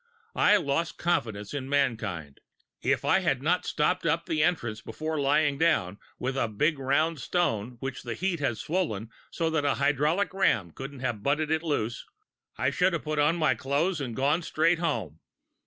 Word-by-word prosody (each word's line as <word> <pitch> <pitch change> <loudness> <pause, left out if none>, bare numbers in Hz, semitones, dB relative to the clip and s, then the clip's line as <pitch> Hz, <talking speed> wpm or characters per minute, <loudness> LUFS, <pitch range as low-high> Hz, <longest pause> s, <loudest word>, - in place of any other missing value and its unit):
I 210 - +5
lost 165 0 -1
confidence 110 - -1
in 135 -2 -4
mankind. 110 - -1 0.4
If - - +1
I 190 - +4
had 140 -8 0
not 175 +4 +1
stopped 180 +4 +1
up 165 +1 +1
the 155 -2 0
entrance 120 -11 0
before 155 +4 -4
lying 145 0 +2
down, 100 - +2 0.2
with 130 +1 -2
a 130 - +1
big 145 +8 0
round 150 +4 +1
stone 120 - -1
which 135 -1 -4
the 120 -2 -5
heat 185 -2 -1
had 130 -6 0
swollen 150 - -2 0.2
so 165 -1 -1
that 160 -2 +1
a 145 - +2
hydraulic 155 +8 +1
ram 115 - +2
couldn't 135 - -8
have 120 -5 -2
butted 150 +5 0
it 160 0 +2
loose, 120 -8 -2 0.5
I 130 - +1
should 180 +5 +2
have 170 - -2
put 155 -1 -2
on 150 +3 +3
my 155 -6 +3
clothes 145 +7 0
and 120 -5 -4
gone 145 +7 +2
straight 165 +1 +2
home." 110 - -2
145 Hz, 180 wpm, -28 LUFS, 120-165 Hz, 0.5 s, I